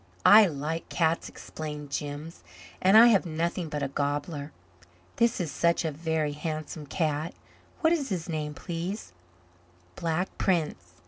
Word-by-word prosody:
"I 210 0 +9
like 155 +1 -4
cats," 165 -1 +1
explained 150 -2 -7
Jims, 145 +3 -5 0.4
"and 190 +3 +6
I 235 +2 +9
have 200 -5 +4
nothing 170 0 -2
but 150 -1 -3
a - - +1
gobbler. 145 +2 -3 0.7
This 235 -1 +2
is 170 -5 -2
such 170 +3 +1
a 160 - 0
Very 160 0 -1
Handsome 155 0 -5
Cat. 155 0 -1 0.5
What 320 0 +4
is 285 -6 -1
his 175 -4 -3
name, 150 -3 -3
please?" 175 - -5 0.8
"Black 170 +3 -2
Prince. 150 - 0
160 Hz, 140 wpm, -28 LUFS, 150-175 Hz, 0.8 s, I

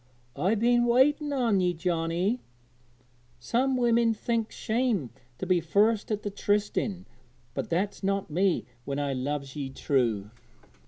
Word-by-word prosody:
'I've 200 +4 +1
been 240 +1 +3
waiting 290 +5 +3
on 240 -8 +2
ye, 180 -1 +1
Johnnie; 175 +6 0 1.0
some 255 - 0
women 235 -2 +3
thinks 225 0 -2
shame 220 - 0 0.3
to - - -4
be 180 -1 +2
first 210 +4 +2
at 210 0 -1
the 205 - -3
trysting, 205 -1 -1 0.5
but - - -4
that's 190 +5 -1
not 195 0 0
me 175 - +1 0.2
when 140 +2 -3
I 145 -1 -1
loves 140 +1 -3
ye 140 -3 -4
true.' 115 -7 0
200 Hz, 140 wpm, -28 LUFS, 160-230 Hz, 1.0 s, been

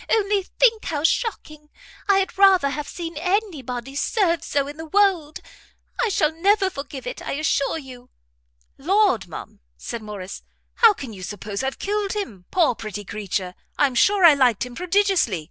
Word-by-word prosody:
Only 410 -2 +2 0.2
think 455 -3 +4
how 295 -2 -2
shocking! 310 -7 -1 0.4
I 395 - +5
had 385 0 -1
rather 380 -7 +5
have 295 0 -4
seen 335 -3 -6
any 365 -1 -1
body 250 +2 -6
served 340 0 +1
so 280 -1 -1
in 290 +1 -8
the 320 0 -8
world. 360 -5 +1 0.6
I 470 - +2
shall 315 -6 +2
never 385 +3 +2
forgive 280 -3 -7
it, - - -6
I - - -4
assure 280 +1 0
you." 255 -4 -11 0.7
"Lord, 360 - +2
ma'am," 165 - -9 0.2
said 235 - -6
Morrice, 205 -3 -8 0.4
"how 455 -3 +7
can 260 -9 -8
you 190 - -10
suppose 200 +1 -5
I've 265 0 -3
killed 410 -1 -2
him? 230 - -5
Poor, 335 -8 +3
pretty 210 -2 -7
creature, 195 -3 -4 0.2
I'm 275 -3 +2
sure 390 +9 +4
I 325 - +9
liked 250 -6 +2
him 250 - -10
prodigiously. 360 - +1
300 Hz, 170 wpm, -22 LUFS, 245-390 Hz, 0.7 s, I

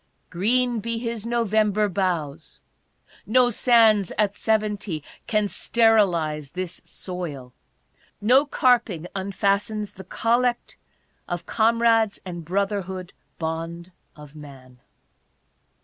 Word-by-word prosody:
Green 235 +6 +1
be 230 +2 -3
his 230 -1 -4
Novei?iber 215 -3 +1
Boughs 165 -5 -3 0.5
I - - -29
No 245 +2 +4
Sands 220 -5 +4
at 205 -2 +1
Seventy 210 -7 -1 0.2
can 210 -2 +1
sterilize 175 -12 +2
this 185 -1 -5
soil. 150 -9 -7 0.7
No 255 +8 +4
carping 235 - +2
unfastens 200 +2 -1
the 190 - -11
Collect 240 +1 0 0.5
of 175 -1 -4
Com 230 +3 +1
rades 225 -3 +3
and 175 -2 -6
Brotherhood 190 0 -3 0.2
Bond 165 +2 -5 0.2
of 150 -1 -14
Man. 135 -4 -13
200 Hz, 100 wpm, -24 LUFS, 170-225 Hz, 0.7 s, No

